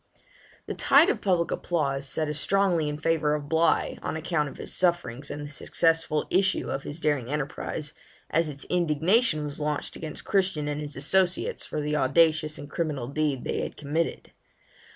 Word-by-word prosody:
The - - -4
tide 310 +8 +5
of - - -4
public 180 -4 +1
applause 140 -5 -1
set 155 +4 -1
as 150 0 -2
strongly 180 -4 +2
in 150 - -4
favour 155 -1 +1
of 145 -1 -5
Bligh, 165 +2 +2
on - - -3
account 160 -2 -1
of - - -12
his - - -5
sufferings 150 -7 0
and 145 0 -5
the 145 - -8
successful 160 +1 +1
issue 190 +1 +2
of 135 - -2
his 145 +4 -6
daring 145 -6 0
enterprise, 150 +1 -3 0.4
as 165 0 +2
its 140 -1 -8
indignation 175 - +2
was 145 0 -6
launched 150 -1 -2
against 155 -2 -6
Christian 185 -7 +1
and 150 0 -2
his 145 -1 -5
associates, 180 +6 +1
for 150 - -3
the 150 +1 -1
audacious 155 +2 +3
and 145 - -8
criminal 145 -4 -2
deed 140 -2 -1
they - - -2
had - - -5
committed. 155 +3 -2
155 Hz, 175 wpm, -27 LUFS, 145-170 Hz, 0.4 s, tide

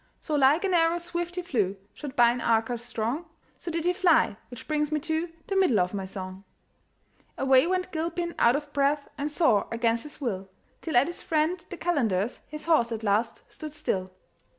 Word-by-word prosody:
So 310 - -5
like 290 +4 +4
an 385 -2 +1
arrow 335 0 +3
swift 345 0 -4
he 360 - -3
flew, 205 - 0 0.2
Shot 285 -3 -8
by 240 -1 +6
an 245 0 -3
archer 230 +1 +2
strong; 240 +6 -3 0.3
So - - -6
did 335 0 -2
he 360 - +3
fly 350 - +3
which 245 - -10
brings 300 -1 0
me 305 - +1
to 320 +2 -1 0.2
The 390 - -3
middle 365 - +4
of 180 +1 0
my 195 -2 -3
song. 190 0 -7 0.9
Away 270 +2 +4
went 365 0 -1
Gilpin, 340 +1 -2
out 235 +2 +5
of 290 0 -4
breath, 285 +1 +1
And 290 0 -2
sore 295 - +3
against 230 0 +1
his 300 - -10
will, 195 -8 -3 0.3
Till 320 -6 0
at 245 - +6
his 345 +2 -6
friend 325 +2 0
the 355 - -6
calender's 240 - 0
His 305 0 -7
horse 310 -8 +3
at 225 -1 -4
last 215 +2 0
stood 305 -1 -8
still. 185 -9 -2
290 Hz, 195 wpm, -27 LUFS, 230-335 Hz, 0.9 s, by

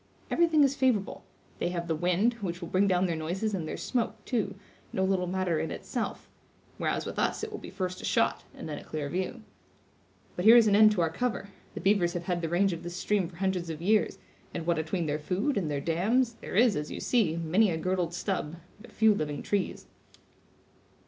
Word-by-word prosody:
Everything 325 -3 +4
is 275 0 +3
favorable; 250 -8 0 0.4
they - - 0
have 170 -1 -3
the 165 - 0
wind, 180 +8 +2
which 175 -3 -3
will 170 - -7
bring 195 +2 +3
down 185 -1 +3
their 170 -2 0
noises 180 +7 -2
and 170 -5 -2
their - - -4
smoke, 235 -4 -1
too, 210 -6 -1 0.4
no 190 - 0
little 190 -1 +1
matter 180 -3 0
in 160 - -2
itself; - - -4 0.5
whereas, - - -1
with - - -4
us - - 0
it 440 - -4
will 415 - -6
be - - -9
first 185 -1 -4
a - - -12
shot, - - +1
and - - -7
then 150 -2 -5
a - - -12
clear 150 -2 -4
view. 190 - -3 0.9
But 180 - -3
here 225 +2 +10
is 235 -2 +8
an 205 -2 +4
end 215 0 +7
to 185 - 0
our 165 -1 +1
cover; 235 +1 -2 0.3
the - - -5
beavers 190 -2 +3
have 175 - -3
had 175 -1 -1
the 165 - -2
range 185 +2 +2
of 165 - -6
this 175 0 -6
stream 200 -1 0
for 175 - -15
hundreds 185 -2 -1
of 160 -2 -5
years, 210 +5 +2 0.4
and 165 - -3
what 170 -1 +1
atween 165 +2 -2
their 150 0 -1
food 195 - -1
and 180 -6 -1
their 145 -1 -1
dams, 215 - +1
there - - -6
is, 230 0 +5
as 150 0 -3
you - - -5
see, 210 -10 +2
many 170 +6 +2
a 165 - -1
girdled 175 0 -1
stub, 170 -4 -2 0.3
but 240 - -14
few 220 -1 +4
living 150 -6 -3
trees." 200 -2 -2
185 Hz, 220 wpm, -29 LUFS, 170-210 Hz, 0.9 s, here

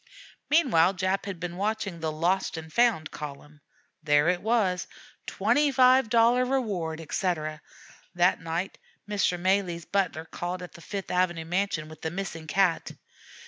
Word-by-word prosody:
Meanwhile 210 - +4
Jap 190 +2 -1
had 190 -4 -5
been 175 -1 -5
watching 205 -3 -2
the 160 -1 -2
'Lost 170 +3 0
and 160 -1 -8
Found' 230 -9 +2
column. 150 0 -9 0.4
There 150 +1 +3
it 180 0 0
was, 205 -6 +1 0.4
"$25 255 -3 +4
reward," 185 -12 -1
etc. 155 -2 -2 0.5
That 175 +1 +3
night 165 +4 -4 0.3
Mr. 200 -4 0
Malee's 180 -2 0
butler 185 -5 -1
called 180 +2 -5
at 180 - -10
the 170 - -13
Fifth 195 +2 -5
Avenue 175 -2 0
mansion 175 -2 -1
with 155 0 -13
the 160 - -2
missing 165 -3 -5
cat. 180 0 +1
180 Hz, 140 wpm, -27 LUFS, 160-200 Hz, 0.5 s, Meanwhile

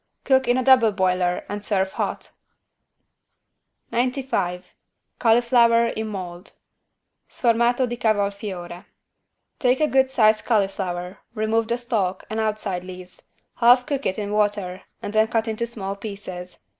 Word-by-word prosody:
Cook 265 -1 +3
in 245 +1 +3
a 255 - +1
double 255 -4 +6
boiler 185 -2 0
and 205 0 -5
serve 190 -2 0
hot. - - -4 1.6
95 240 -8 -1 0.5
CAULIFLOWER 235 0 +4
IN 220 0 -3
MOLD 180 -3 -7 0.8
(Sformato 240 +1 +2
di 240 0 -4
cavolfiore) 200 -5 -2 0.7
Take 255 0 +2
a 305 - +4
good 265 -2 +3
sized 215 -4 +3
cauliflower, 195 -4 -1 0.2
remove 220 +1 0
the 235 +1 0
stalk 210 -6 -2
and 220 - -2
outside 210 -4 -2
leaves, 180 0 -9 0.3
half 245 +1 +5
cook 280 -2 -2
it 185 - -2
in 205 -1 -3
water 205 -3 0 0.2
and 205 - -5
then 220 0 +4
cut 225 0 -1
it - - 0
into 235 +2 -3
small 200 -4 -5
pieces. 195 -3 -8
215 Hz, 135 wpm, -23 LUFS, 190-235 Hz, 1.6 s, double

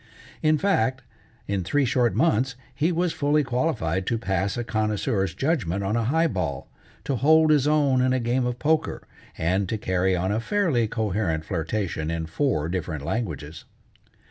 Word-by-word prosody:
In 155 0 +3
fact, 135 - +1 0.4
in 100 -2 -1
three 140 +10 +1
short 125 -1 +1
months 135 -5 +2 0.2
he 150 +6 +1
was 175 0 0
fully 145 +1 +2
qualified 120 - -1
to 115 - +1
pass 100 -1 -1
a 120 - -1
connoisseur's 105 -4 -1
judgment 110 - 0
on 100 +3 -1
a 115 -1 0
high 160 +7 +2
ball, 165 - -2 0.4
to 140 - -1
hold 155 +4 +5
his 145 -2 +3
own 145 -4 +3
in 130 0 +2
a 130 - +2
game 125 +1 0
of 125 -1 -3
poker, 155 +3 0 0.3
and 90 +4 0
to 110 - -1
carry 95 -2 +1
on 90 +2 -1
a 105 - 0
fairly 140 - +1
coherent 100 -8 -1
flirtation 85 -1 -2
in 85 -1 -2
four 85 - 0
different 80 -5 -4
languages. 80 - -4
115 Hz, 170 wpm, -25 LUFS, 95-145 Hz, 0.4 s, hold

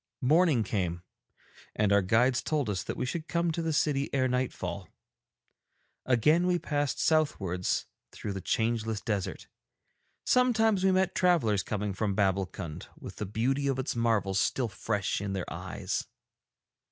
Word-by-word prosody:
Morning 155 -3 +4
came, 90 -4 -2 0.7
and 105 -1 +2
our 100 - +5
guides 120 +6 +3
told 145 -8 -1
us 95 - -2
that - - -5
we 125 - -1
should 155 +5 -4
come 170 0 0
to 170 - -2
the 165 0 -1
city 145 -2 +1
ere 130 -1 +2
nightfall. 125 0 -3 1.2
Again 150 +8 +3
we 180 -1 +3
passed 145 -4 -1
southwards 100 - +1 0.3
through 100 - -5
the 95 - -5
changeless 110 -1 0
desert; 105 -4 -3 0.8
sometimes 225 -6 +3
we 190 - +4
met 185 0 +2
travellers 145 - +3
coming 105 0 -3
from 100 0 -1
Babbulkund, 95 -5 -1
with - - -9
the 105 - -4
beauty 130 +7 0
of 135 -2 0
its 130 - -2
marvels 105 -5 +1
still 125 -4 0
fresh 100 +1 -2
in 100 -1 -3
their 95 -2 -2
eyes. 95 +2 -4
115 Hz, 150 wpm, -29 LUFS, 100-155 Hz, 1.2 s, our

